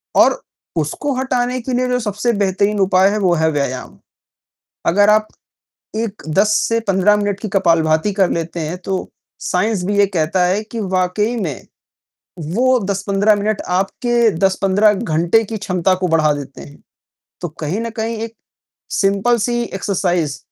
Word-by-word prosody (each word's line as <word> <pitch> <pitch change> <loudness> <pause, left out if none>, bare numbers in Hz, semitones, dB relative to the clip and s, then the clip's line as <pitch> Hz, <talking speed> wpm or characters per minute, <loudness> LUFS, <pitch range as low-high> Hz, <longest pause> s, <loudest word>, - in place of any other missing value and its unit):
और - - +4 0.4
उसको 265 - -2
हटाने 255 -1 -1
के 250 +2 -4
लिए 250 +1 +1
जो 250 0 0
सबसे 220 +2 -1
बेहतरीन 200 +2 +1
उपाय 190 0 +4
है 210 - -1
वो 185 -3 +2
है 160 - +3
व्यायाम। 130 - -3 0.9
अगर 205 +3 +4
आप 215 0 +3 0.7
1, 220 -2 -3
10 200 +7 +2
से 230 0 +1
15 195 +2 +4
मिनट 205 -1 -1
की 220 - -4
कपालभारती 165 0 +2
कर 190 - +4
लेते 170 +1 -3
हैं 175 +3 -4
तो 190 -1 0 0.5
साइंस 185 +1 0
भी 205 +1 -1
ये 205 - +6
कहता 170 +3 +1
है 190 +4 +1
कि 225 +1 -7 0.2
वाक़ई 210 +6 0
में, 165 - -4 0.7
वो 240 +11 +1
10-15 200 +2 +2
मिनट 205 0 -1 0.2
आपके 235 +3 +1 0.2
10-15 195 +2 +3
घंटे 175 +4 +1
की 220 +1 -5
क्षमता 185 -2 0
को 180 - +3
बढ़ा 155 -2 +3
देते 140 -2 -8
हैं। 145 - -13 0.6
तो 175 - -3
कहीं 160 +8 -2
न 230 0 -3
कहीं 225 +1 -2
एक 230 0 -6 0.7
सिम्पल 200 +4 +2
सी 240 0 0
एक्सरसाइज़ 180 - -1
200 Hz, 160 wpm, -18 LUFS, 175-220 Hz, 0.9 s, ये